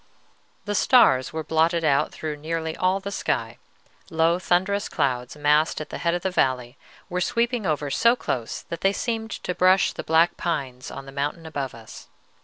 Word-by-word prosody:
The 205 Hz, -, -2 dB
stars 130 Hz, -, +4 dB
were 160 Hz, 0 st, -4 dB
blotted 165 Hz, +2 st, +1 dB
out 140 Hz, -3 st, +2 dB
through 155 Hz, -2 st, -5 dB
nearly 160 Hz, +1 st, -3 dB
all 185 Hz, +1 st, +1 dB
the 200 Hz, +1 st, -6 dB
sky; -, -, -2 dB, 0.5 s
low, 165 Hz, +1 st, +2 dB
thunderous 190 Hz, +3 st, 0 dB
clouds, 125 Hz, -2 st, -1 dB
massed 150 Hz, +2 st, +2 dB
at 155 Hz, -, -7 dB
the -, -, -5 dB
head 170 Hz, 0 st, +1 dB
of 175 Hz, -, -4 dB
the 190 Hz, -, 0 dB
valley, 130 Hz, -6 st, 0 dB, 0.3 s
were 180 Hz, 0 st, -2 dB
sweeping 235 Hz, +1 st, 0 dB
over 150 Hz, -2 st, -1 dB
so 235 Hz, -, +4 dB
close 120 Hz, -, -4 dB
that 170 Hz, -, -7 dB
they 195 Hz, +1 st, +3 dB
seemed 225 Hz, 0 st, -3 dB
to 180 Hz, -, -4 dB
brush 185 Hz, +1 st, +3 dB
the -, -, -5 dB
black 160 Hz, +2 st, +3 dB
pines 130 Hz, -7 st, -3 dB
on 135 Hz, -, -8 dB
the 135 Hz, -, -10 dB
mountain 145 Hz, +4 st, -3 dB
above 140 Hz, -6 st, -4 dB
us. 115 Hz, -1 st, -12 dB
160 Hz, 185 wpm, -24 LUFS, 145-185 Hz, 0.5 s, stars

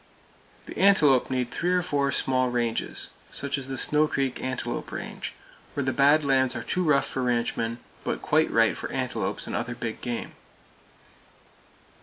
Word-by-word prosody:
The -, -, -9 dB
antelope 155 Hz, -10 st, +5 dB
need 125 Hz, -2 st, -1 dB
three 175 Hz, +6 st, -1 dB
or 180 Hz, -1 st, +2 dB
four 140 Hz, -5 st, 0 dB
small 130 Hz, -1 st, +2 dB
ranges, 120 Hz, -2 st, -1 dB, 0.2 s
such 140 Hz, 0 st, -2 dB
as 130 Hz, -, -5 dB
the 135 Hz, -1 st, -4 dB
Snow 150 Hz, +4 st, +3 dB
Creek 135 Hz, -3 st, -1 dB
Antelope 130 Hz, 0 st, -3 dB
Range, -, -, -5 dB, 0.4 s
where 140 Hz, -, 0 dB
the 130 Hz, 0 st, 0 dB
bad 145 Hz, +2 st, +4 dB
lands 130 Hz, -2 st, +3 dB
are 120 Hz, -, -4 dB
too 180 Hz, +9 st, -1 dB
rough 145 Hz, -4 st, +3 dB
for 130 Hz, -, -3 dB
ranchmen, 115 Hz, -1 st, 0 dB, 0.3 s
but -, -, -2 dB
quite -, -, +2 dB
right -, -, +3 dB
for -, -, -5 dB
antelopes -, -, -2 dB
and -, -, -4 dB
other 120 Hz, -, -3 dB
big 115 Hz, -2 st, -5 dB
game. 120 Hz, -2 st, -4 dB
130 Hz, 165 wpm, -26 LUFS, 125-145 Hz, 0.4 s, antelope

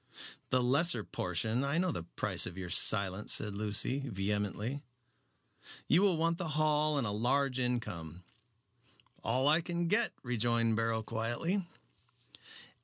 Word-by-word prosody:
"The 125 Hz, -1 st, +2 dB
lesser 135 Hz, -1 st, +3 dB
portion. 110 Hz, +10 st, -1 dB
I 140 Hz, +3 st, 0 dB
know 180 Hz, 0 st, +1 dB
the 85 Hz, -, -4 dB
price 85 Hz, -, -2 dB
of 90 Hz, -, -9 dB
your 90 Hz, -2 st, -6 dB
silence," 100 Hz, 0 st, +4 dB
said 105 Hz, -, -1 dB
Lucy, 105 Hz, +6 st, 0 dB
vehemently. 105 Hz, +6 st, -2 dB, 1.1 s
"You 170 Hz, -, +4 dB
will 195 Hz, -4 st, +3 dB
want 165 Hz, +1 st, 0 dB
the 175 Hz, -, -3 dB
Hall 155 Hz, -1 st, +2 dB
and 135 Hz, -, 0 dB
a 105 Hz, -, -2 dB
large 130 Hz, +5 st, 0 dB
income." 90 Hz, -9 st, -4 dB, 1.0 s
"All 130 Hz, +2 st, +1 dB
I 155 Hz, +3 st, +4 dB
can 170 Hz, 0 st, -2 dB
get," 220 Hz, +5 st, +2 dB
rejoined 115 Hz, -2 st, 0 dB
Beryl, 115 Hz, 0 st, -1 dB
quietly. 120 Hz, -, -2 dB
125 Hz, 135 wpm, -32 LUFS, 105-155 Hz, 1.1 s, silence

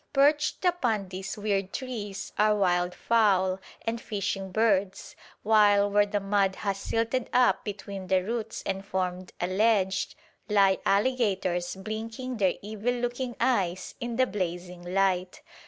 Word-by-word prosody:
Perched 295 Hz, +5 st, +3 dB
upon 235 Hz, -, +1 dB
these 190 Hz, +2 st, -6 dB
weird 200 Hz, -2 st, -1 dB
trees 210 Hz, -7 st, -5 dB
are 210 Hz, 0 st, +3 dB
wild 180 Hz, -2 st, +1 dB
fowl 190 Hz, -5 st, +2 dB, 0.2 s
and 230 Hz, +1 st, -2 dB
fishing 195 Hz, -2 st, -3 dB
birds, 200 Hz, -2 st, +1 dB, 0.3 s
while, 205 Hz, -2 st, +4 dB
where 205 Hz, 0 st, +4 dB
the 205 Hz, 0 st, -1 dB
mud 195 Hz, -1 st, +1 dB
has 200 Hz, -1 st, -2 dB
silted 230 Hz, +4 st, -1 dB
up 250 Hz, -1 st, +3 dB
between 200 Hz, -2 st, -6 dB
the 185 Hz, 0 st, +2 dB
roots 225 Hz, +2 st, -4 dB
and 195 Hz, 0 st, -2 dB
formed 185 Hz, -1 st, -3 dB
a -, -, 0 dB
ledge, 190 Hz, 0 st, +1 dB, 0.3 s
lie 195 Hz, -2 st, +4 dB
alligators 195 Hz, -6 st, +1 dB
blinking 225 Hz, +5 st, -5 dB
their 190 Hz, -4 st, +2 dB
evil 215 Hz, +4 st, -2 dB
looking 245 Hz, 0 st, -3 dB
eyes 195 Hz, -8 st, 0 dB
in 235 Hz, -1 st, -4 dB
the 255 Hz, +2 st, +4 dB
blazing 180 Hz, -4 st, -4 dB
light. 185 Hz, 0 st, 0 dB
200 Hz, 140 wpm, -28 LUFS, 190-230 Hz, 0.3 s, while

